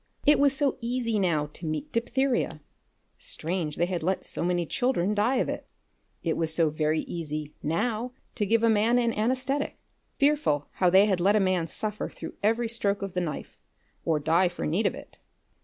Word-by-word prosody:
It 295 - +6
was 280 -1 +4
so 285 -3 +1
easy 235 -2 0
now 165 -6 +1
to 170 - -7
meet 275 - -3
diphtheria. 240 - 0 0.6
Strange 165 -2 -3
they 170 - +2
had 175 -1 -2
let 185 +4 0
so - - -4
many 175 0 +1
children 210 - 0
die 215 +5 +2
of 255 - +1
it! - - -4 0.6
It 165 - 0
was 160 -1 0
so 160 -1 +2
very 155 +1 +1
easy 155 -3 -5
now 220 +9 -1 0.2
to 210 -4 -1
give 230 +2 +3
a - - +5
man 225 +2 +3
an 235 -2 +2
anesthetic. 260 +6 -1 0.4
Fearful 280 - +2
how 180 - +2
they 190 +3 +6
had 190 -4 +1
let 200 +4 +4
a - - +5
man 185 -4 +1
suffer 210 +5 -3
through - - -8
every 230 +3 +2
stroke 205 -3 0
of 195 -2 -4
the 180 - 0
knife, 155 -5 -5 0.4
or 160 -2 +1
die 165 +5 +3
for 175 - -5
need 190 +7 +1
of - - -2
it! - - -12
200 Hz, 190 wpm, -27 LUFS, 165-235 Hz, 0.6 s, It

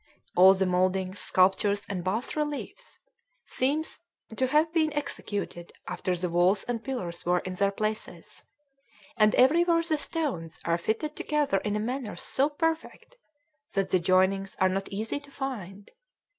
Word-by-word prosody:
All 190 +2 +8
the 190 0 +1
mouldings, 185 +1 0
sculptures, 195 +2 +2
and 185 -3 -4
bass 210 +7 -2
reliefs 300 - -4 0.5
seem 285 +5 0
to - - -10 0.4
to 260 +3 +1
have 305 +4 +2
been 315 -2 +2
executed 205 - -4 0.2
after 185 - -2
the 180 +1 -1
walls 180 +3 +2
and 235 -2 -3
pillars 180 -11 -4
were 180 +1 +2
in 185 - -5
their 200 +2 +2
places; 215 +2 -4 0.7
and 215 -2 +4
everywhere 335 +6 +4
the 315 -2 0
stones 275 - -3
are 170 0 +1
fitted 260 - -2
together 295 -10 0
in 210 +1 -2
a - - 0
manner 245 0 -3
so 275 +3 0
perfect 325 +9 -3 0.6
that 195 -1 0
the 185 - +4
joinings 190 +2 +2
are 190 - +4
not 195 +1 -2
easy 220 +7 -3
to 285 0 -16
find. 210 -8 -6
210 Hz, 155 wpm, -28 LUFS, 185-285 Hz, 0.7 s, All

